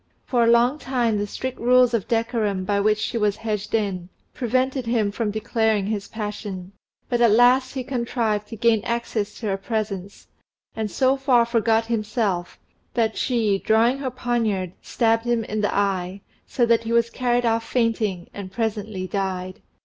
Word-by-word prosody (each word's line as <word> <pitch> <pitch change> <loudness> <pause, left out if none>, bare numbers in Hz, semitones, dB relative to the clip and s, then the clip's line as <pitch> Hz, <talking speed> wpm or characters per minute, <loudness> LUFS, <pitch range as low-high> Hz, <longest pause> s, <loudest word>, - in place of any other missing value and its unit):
For 240 -2 +2
a - - +3
long 240 +5 +4
time 240 -6 0
the 205 - -2
strict 260 +5 -5
rules 250 0 +4
of 225 -5 0
decorum 225 -5 0
by 200 +1 +1
which 210 +1 +3
she 230 +2 -2
was 210 -2 +2
hedged 215 -1 -3
in 190 -5 -2 0.2
prevented 255 +1 -1
him 225 -4 +1
from 215 +1 -2
declaring 220 -1 0
his 205 -1 -3
passion; 205 -4 -6 0.4
but 240 -1 0
at 235 - +6
last 250 +4 +4
he 260 - -2
contrived 235 -4 -1
to 225 - -7
gain 225 -1 +2
access 230 -3 -2
to 230 - -8
her 195 -2 0
presence, 200 -2 -4 0.5
and 220 -1 -2
so 260 +5 +2
far 255 -3 +3
forgot 225 -1 +2
himself, 210 -5 -1 0.4
that 225 -2 +1
she, 220 -6 +1
drawing 230 +6 +3
her 270 -2 -2
poniard, 230 -7 -1
stabbed 225 -1 +1
him 240 -1 +1
in 215 0 -3
the 205 - +1
eye, 195 -1 -1 0.3
so 240 - +1
that 230 -1 +3
he 225 - -4
was 235 0 +2
carried 245 -1 0
off 225 0 +1
fainting, 225 -7 -1
and 195 -2 -7
presently 210 -3 -3
died. 185 -1 -3
225 Hz, 170 wpm, -23 LUFS, 205-240 Hz, 0.5 s, at